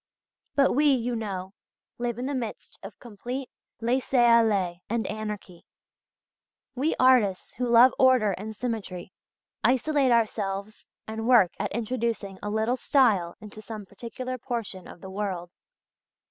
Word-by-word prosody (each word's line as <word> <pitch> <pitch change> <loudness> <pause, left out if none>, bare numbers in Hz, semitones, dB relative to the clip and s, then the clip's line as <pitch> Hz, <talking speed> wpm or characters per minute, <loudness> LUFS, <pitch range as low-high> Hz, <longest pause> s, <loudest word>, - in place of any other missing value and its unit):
But 275 -2 +4
we, 295 +3 +3
you 245 -2 0
know, 195 -4 -5 0.5
live 240 -1 -2
in 250 - -3
the 285 - -2
midst 240 -5 -5
of 195 +1 -10
complete 245 +4 -7 0.3
laisser 255 +3 0
aller 220 -7 +4
and 230 0 -1
anarchy; 210 -4 -6 1.1
we 280 +5 0
artists 245 -8 +3
who 250 -1 -2
love 240 +2 +7
order 255 -5 +5
and 215 +3 -6
symmetry 200 -7 -5 0.5
isolate 265 +3 +2
ourselves 215 -2 -1 0.2
and 220 +1 -4
work 235 -8 +6
at - - -2
introducing 225 -4 -3
a 205 - -4
little 220 +4 0
style 215 -11 +2
into 215 0 -11
some 215 -1 -8
particular 250 +5 -6
portion 225 -7 -4
of - - -12
the 190 - -8
world" 190 -3 -3
(page - - -63
59). - - -66
225 Hz, 145 wpm, -26 LUFS, 200-250 Hz, 1.1 s, love